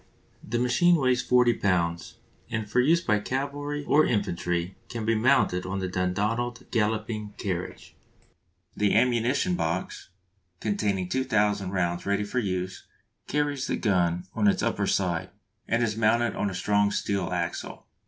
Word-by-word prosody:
The 120 - -2
machine 150 +9 +4
weighs 130 -5 +2
40 125 -1 +3
lbs., 85 -3 0 0.3
and 110 -2 -3
for 105 - +1
use 160 +7 +4
by 105 -7 +1
cavalry 145 +5 -3
or 155 +2 +5
infantry 90 - -1
can 115 -2 -4
be 115 - +2
mounted 110 -6 +3
on 95 +1 -3
the 95 -1 -2
Dundonald 105 +7 -1
Galloping 110 -1 -1
Carriage. 90 -3 -5 0.8
The 105 -1 +2
ammunition 120 -4 +2
box, 85 +1 -3 0.5
containing 100 -3 -1
2000 105 -4 +1
rounds 90 -1 -1
ready 100 +1 +1
for 105 +5 -2
use, 95 -3 -3 0.4
carries 145 -2 -1
the - - -1
gun 90 -4 +1
on 105 -2 +2
its 100 - +2
upper - - 0
side, 90 -4 0 0.4
and 115 +1 +1
is 110 -2 0
mounted 115 +2 +2
on 105 - -1
a 95 - -6
strong 105 +2 +2
steel 100 -2 -1
axle. 85 -1 -4
105 Hz, 145 wpm, -27 LUFS, 95-120 Hz, 0.8 s, or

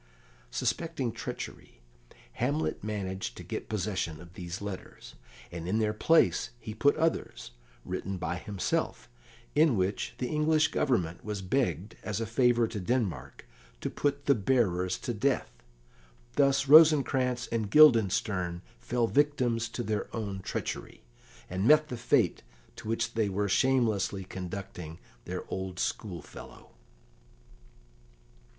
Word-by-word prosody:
Suspecting 140 - -1
treachery, - - -7 0.5
Hamlet 140 +1 -1
managed 95 -3 -4
to - - -8
get - - -6
possession 95 -6 -2
of 85 0 -13
these 90 0 -6
letters, 100 -2 -8 0.4
and 85 -1 -6
in 100 +4 +1
their 110 -1 +1
place 160 +2 +3
he 110 -2 -7
put 145 +6 +3
others, 160 - -1 0.3
written 95 0 -4
by 90 0 -3
himself, 95 -9 -2 0.5
in 150 -6 +4
which 95 +2 -1
the 125 - -2
English 155 +2 +2
Government 90 - 0
was 105 -2 -4
begged, 105 -2 -1
as 110 -1 -3
a 115 - -1
favour 120 0 +3
to 110 - -4
Denmark, 95 - -2 0.4
to - - -3
put 145 0 -1
the 140 - +5
bearers 95 -6 +1
to 120 - -4
death. 130 +6 0 0.8
Thus 140 -1 +3
Rosencrantz 135 -5 +6
and 110 -3 -1
Guildenstern 100 - +4 0.2
fell 120 -1 0
victims 125 -4 +1
to 120 - -4
their 110 -2 -2
own 100 -4 -3
treachery, 95 - -5 0.4
and 95 +4 -1
met 155 +1 +6
the 125 - -3
fate 115 - +2 0.4
to - - -9
which 115 +1 -1
they 110 -3 +1
were 100 +1 0
shamelessly 110 -4 +2
conducting 90 -3 -7 0.3
their - - -4
old 95 -1 -4
schoolfellow. 90 -1 -6
110 Hz, 130 wpm, -29 LUFS, 95-130 Hz, 0.8 s, Rosencrantz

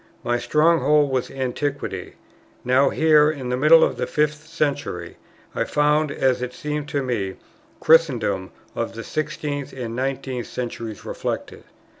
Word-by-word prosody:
My 120 0 0
stronghold 150 -2 +3
was 130 -1 -1
Antiquity; 135 -6 -3 0.5
now 130 +3 +4
here, 155 -1 +4
in 135 -5 -4
the 125 - +1
middle 155 +5 +6
of - - +1
the - - -2
fifth 150 +1 -1
century, 145 - -3 0.4
I - - 0
found, 150 0 +2
as 130 -3 +1
it 125 0 -4
seemed 150 -3 -4
to 145 -2 -1
me, 105 -7 -2 0.4
Christendom 125 - +3 0.2
of - - -3
the - - -6
sixteenth 145 -2 -4
and 135 - -10 0.2
the 125 - -2
nineteenth 130 -2 -3
centuries 115 -3 -6
reflected. - - -5
140 Hz, 145 wpm, -23 LUFS, 125-150 Hz, 0.5 s, middle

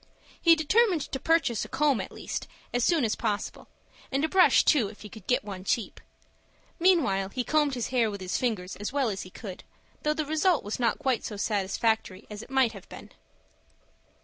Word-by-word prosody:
He 335 -1 +7
determined 360 +3 +3
to 265 - -3
purchase 320 -8 +1
a - - -6
comb, 275 -1 +2
at - - -7
least, - - -5 0.3
as 245 -1 +1
soon 320 -5 +3
as 215 - 0
possible, 210 -3 -3 0.4
and 275 +3 +1
a - - 0
brush 370 +3 +5
too, 265 -9 +4
if 205 +1 -12
he 210 - -9
could 210 -2 -13
get 250 +2 +2
one 190 -3 -7
cheap. 215 +2 -2 0.8
Meanwhile 320 - +3
he 250 +5 -3
combed 295 0 +1
his 245 - -3
hair 240 -4 +2
with 200 -1 -6
his 185 -1 -4
fingers 210 -7 -1
as 205 +3 -4
well 275 -3 +1
as 195 -2 -4
he 185 - -9
could, 185 0 -9 0.4
though 300 0 0
the 310 -1 -1
result 315 +3 +2
was 205 +4 -4
not 230 -3 +1
quite 265 -5 0
so 210 - -5
satisfactory 205 0 -1
as 210 0 -6
it - - -12
might 265 -3 +3
have 195 -4 -12
been. - - -11
245 Hz, 200 wpm, -28 LUFS, 205-300 Hz, 0.8 s, He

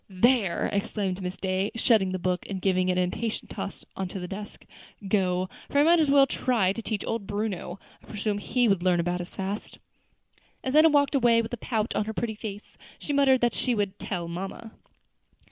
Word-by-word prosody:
"There!" 195 -1 +2
exclaimed 200 -1 -2
Miss 180 0 -4
Day, 190 +1 -1
shutting 220 -5 +3
the 185 - -1
book 180 0 -2
and 195 -2 -3
giving 185 -1 +1
it 180 - +1
an 180 - +3
impatient 220 +5 -3
toss - - -6
on 190 - -3
to 190 - -6
the 180 - -5
desk; 205 +3 -8 0.4
"go, 185 -2 +1 0.2
for - - -1
I 285 - +6
might 335 +2 +5
as 305 -3 +3
well 275 -1 +6
try 235 -8 +1
to 230 - -5
teach 215 -2 -3
old 225 -4 -3
Bruno. 205 -3 -3 0.2
I - - -20
presume 210 0 -2
he 245 +3 +1
would 195 -4 +2
learn 180 -1 +3
about 175 +1 -1
as 175 - -7
fast." 195 +2 -5 0.9
And 260 +2 -1
Enna 315 +1 +8
walked 285 -1 +3
away 235 -4 +4
with 225 - -7
a - - -2
pout 220 -1 -2
on 210 - +1
her 220 - -4
pretty 225 0 -2
face, 210 -1 -8 0.3
muttering 280 -2 +5
that 240 -1 +2
she 250 -2 0
would 200 -2 -2
"tell 175 -4 -4
mamma." 190 +6 -6
205 Hz, 205 wpm, -27 LUFS, 185-235 Hz, 0.9 s, Enna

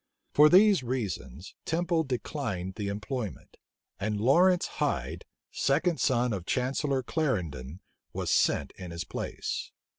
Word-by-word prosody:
For 150 +1 +7
these 195 -1 +6
reasons, 100 - -4
Temple 170 0 +1
declined 120 - -3
the 105 0 -4
employment; 105 +2 -5 0.4
and 105 +1 -1
Lawrence 175 - +4 0.2
Hyde, - - -1 0.3
second 165 +5 +1
son 125 -3 +2
of 90 -3 -5
Chancellor 135 +1 0
Clarendon, 90 - -2 0.3
was - - -2
sent - - +2
in 90 - -7
his 85 0 -4
place. - - -4
125 Hz, 120 wpm, -29 LUFS, 100-150 Hz, 0.4 s, For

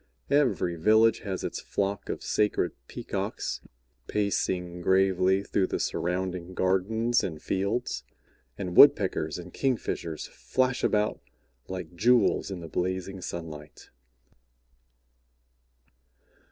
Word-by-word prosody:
Every 130 -12 +2
village 110 +6 +4
has 95 -3 -4
its - - -3
flock 100 0 -2
of - - -4
sacred 105 -1 +1 0.2
Peacocks - - -4 0.5
pacing 90 -4 -1
gravely 95 +1 +3
through 95 -1 0
the - - -2
surrounding 90 +1 -2
gardens 110 +6 +1
and 80 -4 -4
fields, 100 +9 -2 0.5
and 90 -2 -4
Woodpeckers 95 - +5
and 90 0 -9
Kingfishers 110 - -2
flash 130 -1 -1
about 105 0 +1 0.5
like 90 -2 -6
jewels 115 +3 +3
in 95 -3 -5
the 80 - -7
blazing 95 +3 -3
sunlight." 80 -4 -8
95 Hz, 100 wpm, -28 LUFS, 90-105 Hz, 0.5 s, Woodpeckers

